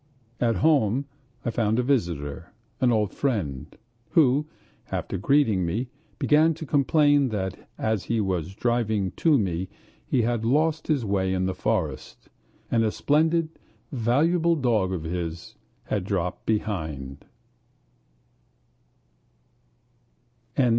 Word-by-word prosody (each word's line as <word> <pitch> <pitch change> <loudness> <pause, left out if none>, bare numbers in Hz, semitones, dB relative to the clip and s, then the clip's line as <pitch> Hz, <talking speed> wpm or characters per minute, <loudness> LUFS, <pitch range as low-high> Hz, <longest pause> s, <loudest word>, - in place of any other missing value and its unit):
At 115 -2 +2
home 135 - +2 0.4
I 120 - 0
found 110 -1 +1
a 125 - +2
visitor, 85 - -2 0.3
an 125 -2 +3
old 105 -3 +1
friend, 95 - -2 0.5
who, 150 -2 +4 0.4
after - - -3
greeting 110 -4 +3
me, 110 +10 -2 0.3
began 155 +2 +3
to 160 0 -7
complain 145 -1 +3
that 95 -3 -4
as 110 -5 -1
he 115 +3 0
was 95 -3 -2
driving 110 -5 0
to 160 -4 +4
me 95 -4 -2 0.4
he 125 - +2
had 115 -1 0
lost 155 +6 +1
his 145 -7 +1
way 95 -2 0
in 95 0 0
the 95 - -1
forest, - - -3 0.4
and 115 -1 +3
a 110 - +1
splendid 160 +5 +2 0.4
valuable 160 +8 +2
dog 115 - +1
of 90 -4 -3
his 85 0 -4 0.3
had 100 -3 -2
dropped 90 -2 -3
behind. 80 -11 -3
110 Hz, 120 wpm, -25 LUFS, 95-140 Hz, 0.5 s, who